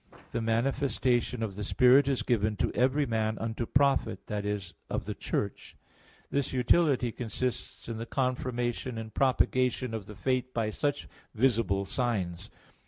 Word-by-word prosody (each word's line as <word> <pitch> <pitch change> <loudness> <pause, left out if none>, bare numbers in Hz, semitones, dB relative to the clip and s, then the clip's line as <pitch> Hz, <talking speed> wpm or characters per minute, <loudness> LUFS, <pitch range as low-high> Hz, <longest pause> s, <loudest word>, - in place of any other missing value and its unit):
12:7) - - -21
"the 115 - -1
manifestation 125 0 +1
of 100 -4 -3
the 105 - -4
Spirit 125 +6 +5
is 135 -2 +1
given 110 -3 +1
to 95 - 0
every 135 +4 +2
man 110 -2 0
unto 115 +1 -3
profit" 135 -8 +2
that 105 -1 -3
is, 100 -4 -3 0.2
of - - -2
the - - -3
Church. 100 - -3 0.6
This 140 -2 0
utility 130 0 +3
consists 120 +2 -4
in 115 -1 -4
the 115 - -5
confirmation 125 -2 -1
and 110 -1 -6
propagation 130 -2 +2
of 110 -3 -5
the 105 - -9
faith 130 +2 -1
by 110 -2 0
such 145 +5 -1 0.3
visible 110 -5 +2
signs. 95 -7 -2
120 Hz, 155 wpm, -29 LUFS, 110-130 Hz, 0.6 s, Spirit